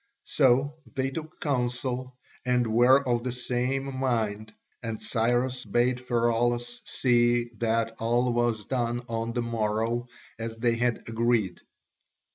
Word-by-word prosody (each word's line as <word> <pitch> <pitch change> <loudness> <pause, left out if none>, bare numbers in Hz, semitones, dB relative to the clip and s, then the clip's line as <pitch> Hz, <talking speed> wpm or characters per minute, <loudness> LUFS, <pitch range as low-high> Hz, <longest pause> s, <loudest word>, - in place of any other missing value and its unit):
So 140 +2 +2 0.2
they 135 0 0
took 155 +2 -7
counsel 125 -1 -2 0.3
and 125 -1 +2
were 130 +4 +5
of 120 -1 +2
the 125 +1 -3
same 125 +2 -2
mind, 110 -5 -1 0.3
and 115 -2 -4
Cyrus 120 +3 0
bade 120 +4 +1
Pheraulas 120 0 0
see 120 -1 +2
that 115 -1 +1
all 120 +2 +1
was 120 -3 0
done 120 -2 -1
on 115 0 -2
the 120 -1 -1
morrow 115 +1 -1 0.3
as 115 0 -4
they 120 0 +2
had 120 0 0
agreed. 115 -3 +1
120 Hz, 125 wpm, -27 LUFS, 115-125 Hz, 0.3 s, were